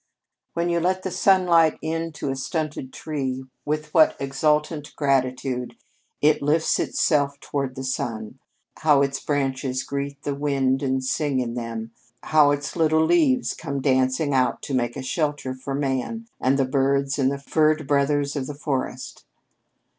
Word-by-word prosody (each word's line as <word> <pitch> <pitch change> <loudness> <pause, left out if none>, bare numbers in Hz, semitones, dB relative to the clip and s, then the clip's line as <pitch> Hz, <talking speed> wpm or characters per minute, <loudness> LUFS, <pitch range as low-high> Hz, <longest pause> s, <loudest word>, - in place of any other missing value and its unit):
"When 170 +1 0
you 170 0 +1
let 185 +2 0
the 190 - -3
sunlight 180 -4 +4
in 165 +1 -3
to 150 -2 -3
a - - -2
stunted 150 -1 -3
tree, 130 -4 -4 0.2
with 150 0 -3
what 160 -2 +5
exultant 150 +2 0
gratitude 130 -3 0 0.5
it 150 +1 +4
lifts 150 +3 +2
itself 140 -2 +1
toward 135 -3 -3
the 130 - -5
sun! 115 -2 -4 0.4
How 150 -3 +4
its 135 -1 -1
branches 135 -3 -1
greet 140 0 -4
the 145 - -1
wind 135 -2 0
and 130 -1 0
sing 140 0 0
in 120 -2 -2
them, 115 -1 -5 0.3
how 150 -2 +5
its 145 0 -2
little 160 -1 +3
leaves 265 - +3
come 140 -4 -4
dancing 130 +2 +1
out 130 -2 +1
to 140 - -4
make 120 0 0
a 135 - -5
shelter 145 -1 -1
for 130 +1 -5
man 140 - -2
and 135 +1 +2
the 135 - +2
birds 135 +1 +1
and 135 0 +3
the 140 - -2
furred 155 +2 +1
brothers 140 0 +1
of 135 -3 -2
the 145 - -6
forest! 140 -2 -4
140 Hz, 160 wpm, -24 LUFS, 130-155 Hz, 0.5 s, what